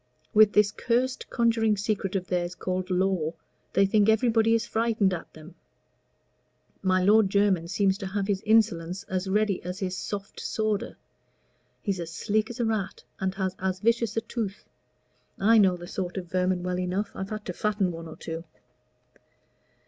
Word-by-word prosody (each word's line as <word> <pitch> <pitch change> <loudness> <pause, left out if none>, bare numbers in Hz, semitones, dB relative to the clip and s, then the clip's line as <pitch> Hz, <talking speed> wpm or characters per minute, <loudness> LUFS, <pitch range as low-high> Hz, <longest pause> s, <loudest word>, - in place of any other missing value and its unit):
With 215 -1 +6
this 210 -1 +4
cursed 250 +4 -1
conjuring 225 -3 +2
secret 200 -1 -2
of 185 -2 -1
theirs 180 -1 -2
called 185 0 -3
Law, 180 -3 0 0.4
they 195 - +5
think 205 +2 +3
everybody 225 0 +3
is 230 - 0
frightened 225 -4 +1
at 170 - -6
them. 155 +3 -13 1.3
My 185 -1 +2
Lord 210 +1 +5
Jermyn 195 -4 +2
seems 190 +1 +1
to 195 - -4
have 200 +1 -2
his 200 -1 -1
insolence 195 -5 +2
as 185 0 -3
ready 210 -1 +1
as 180 +1 -5
his 190 -2 -3
soft 200 +1 -5
sawder. 215 +1 -2 0.9
He's 195 -4 -1
as 170 -1 -5
sleek 215 +6 0
as 240 +1 -8
a 235 - +1
rat, 215 -4 -2 0.2
and 190 0 -1
has 190 -1 -2
as 190 0 -1
vicious 230 0 +1
a - - +2
tooth. 220 -3 -5 0.7
I 220 +3 +5
know 185 -3 +4
the 175 - -9
sort 180 0 -4
of 175 -3 -6
vermin 185 -1 +1
well 180 0 -2
enough. 185 +3 -2
I've 190 +1 -5
helped 215 -1 -5
to 180 - -4
fatten 205 -1 0
one 165 0 -7
or 160 - -9
two." 165 0 -6
195 Hz, 170 wpm, -27 LUFS, 185-215 Hz, 1.3 s, With